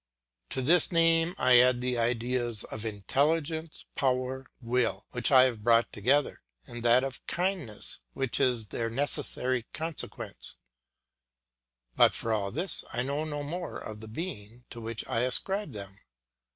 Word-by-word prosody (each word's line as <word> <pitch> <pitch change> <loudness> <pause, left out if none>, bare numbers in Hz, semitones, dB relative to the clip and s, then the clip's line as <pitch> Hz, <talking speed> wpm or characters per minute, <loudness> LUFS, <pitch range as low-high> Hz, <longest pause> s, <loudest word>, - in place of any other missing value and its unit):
To 130 - -2
this 165 +5 +4
name 165 +1 +4
I 125 -1 +6
add 125 0 +4
the 125 -1 -1
ideas 120 -1 0
of 110 +1 -6
intelligence, 150 +9 -1
power, 130 0 -1
will, 115 -5 0
which 125 +2 +1
I 130 -2 +8
have 120 -5 0
brought 115 0 +3
together, 135 +8 +1 0.2
and 120 - -8
that 120 +2 +5
of 135 -1 -5
kindness 175 - -1
which 135 -3 -1
is 125 -6 +1
their 115 -1 -2
necessary 130 -1 -1
consequence; 160 -1 -4 1.4
but - - +5
for 115 - -1
all 100 -2 0
this 175 - +1
I 120 - -1
know 140 +4 -2
no 145 -2 -4
more 170 +2 -5
of 110 -1 -8
the 110 - -8
being 115 - -7
to 120 - -8
which 115 0 -5
I 115 - 0
ascribe 155 - 0
them. 100 -1 -8
125 Hz, 150 wpm, -29 LUFS, 115-145 Hz, 1.4 s, I